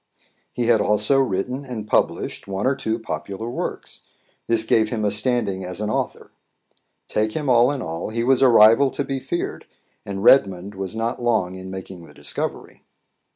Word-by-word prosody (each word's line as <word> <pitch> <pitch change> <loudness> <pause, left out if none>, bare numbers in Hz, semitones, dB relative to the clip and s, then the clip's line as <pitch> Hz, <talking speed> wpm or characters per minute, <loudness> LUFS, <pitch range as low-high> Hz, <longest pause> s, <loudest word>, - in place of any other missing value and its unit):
He 120 - -2
had 115 -2 +4
also 105 +6 +2
written 125 +3 -1
and 120 -6 -6
published - - -1
one 95 +2 -3
or 135 +1 +2
two 110 -4 -2
popular 110 -1 -5
works; 120 - -5 0.5
this 115 -1 +3
gave 110 -1 +2
him 110 -2 -2
a 105 - +1
standing 105 -3 0
as 90 0 -6
an 105 0 -2
author. - - -3 0.8
Take 110 0 -1
him 150 -2 -3
all 120 +1 +5
in 140 -2 -4
all, 80 +4 -4
he 115 +1 -2
was 130 +1 +3
a 135 - +7
rival 115 +4 +6
to 140 - -3
be 135 -1 -3
feared, 135 +7 -4 0.4
and 100 -1 -5
Redmond 100 -6 +4
was 95 +1 -5
not 115 +2 -2
long 110 -7 +1
in 95 0 -8
making 95 -1 -8
the 85 - -15
discovery. - - -5
110 Hz, 180 wpm, -22 LUFS, 100-125 Hz, 0.8 s, a